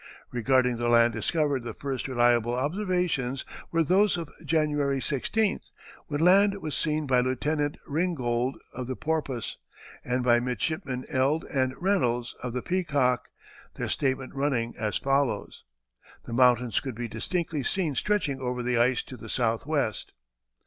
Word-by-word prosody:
] - - -25
Regarding 125 0 +2
the 120 0 0
land 115 0 +5
discovered 150 -5 0
the 120 -2 -6
first 135 -2 -3
reliable 120 -2 +3
observations 155 -4 -1 0.3
were 165 0 +3
those 190 +4 +3
of 165 -4 -6
January 150 -3 +1
16th, 195 - -1 0.4
when 145 0 -2
land 200 +3 +5
was 155 -5 -4
seen 155 -1 0
by 130 -2 +3
Lieutenant 145 +4 0
Ringgold, 135 -6 0 0.2
of 125 0 -5
the 130 - -3
Porpoise, 150 -7 -2 0.5
and 125 0 -1
by 120 -1 +5
Midshipmen 125 +1 -2
Eld 140 +5 +1
and 130 -1 +1
Reynolds, 125 -11 +1
of 125 -2 -4
the 125 - -3
Peacock, 145 -9 +1 0.5
their - - -3
statement 130 -1 -1
running 135 -4 0
as 110 -2 -1
follows: 135 -6 -1 0.6
"The 115 - -6
mountains 125 -2 +4
could 130 -4 -6
be 120 +1 -4
distinctly 155 - -2
seen 165 +2 -1
stretching 155 -4 0
over 125 -1 -2
the 120 -1 +1
ice 125 +1 +3
to 130 - -10
the 110 0 -10
southwest." 120 +1 -1
130 Hz, 150 wpm, -27 LUFS, 120-155 Hz, 0.6 s, land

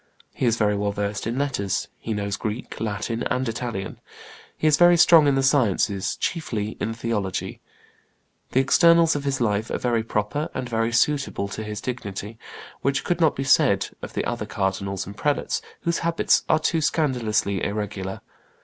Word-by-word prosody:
He 130 - 0
is 115 -1 +2
very 105 -2 +2
well 100 0 0
versed 100 0 -3
in 115 +2 -2
letters: 135 -9 -1
he 115 - -5
knows 100 -1 -2
Greek, 110 +4 -5
Latin, 115 +2 -2
and 130 0 0
Italian. 115 -4 -4 0.6
He - - -3
is 155 -1 +6
very 175 +1 +6
strong 165 -3 +7
in 140 - +3
the 135 - +1
sciences, 110 -8 +2
chiefly 115 -11 -2
in 115 +1 -2
theology. 110 -5 -3 0.9
The 130 - +3
externals 170 +4 +5
of 145 -1 -3
his 135 -1 0
life 110 -2 0
are - - -1
very 120 -2 0
proper 110 +6 -2
and 125 - -3
very 115 -1 0
suitable 135 -4 +1
to 110 - -5
his 105 -1 -5
dignity, 110 -3 -5 0.4
which 140 +1 0
could 175 -1 -1
not 160 -3 +4
be 135 - -2
said 135 -8 +3
of - - -7
the - - -2
other - - -3
cardinals 95 0 -2
and 100 - -9
prelates, 145 +4 -1 0.2
whose 170 0 0
habits 165 0 +2
are 155 - +5
too 160 +1 0
scandalously 115 - 0
irregular. 100 -2 -3
115 Hz, 175 wpm, -24 LUFS, 105-140 Hz, 0.9 s, strong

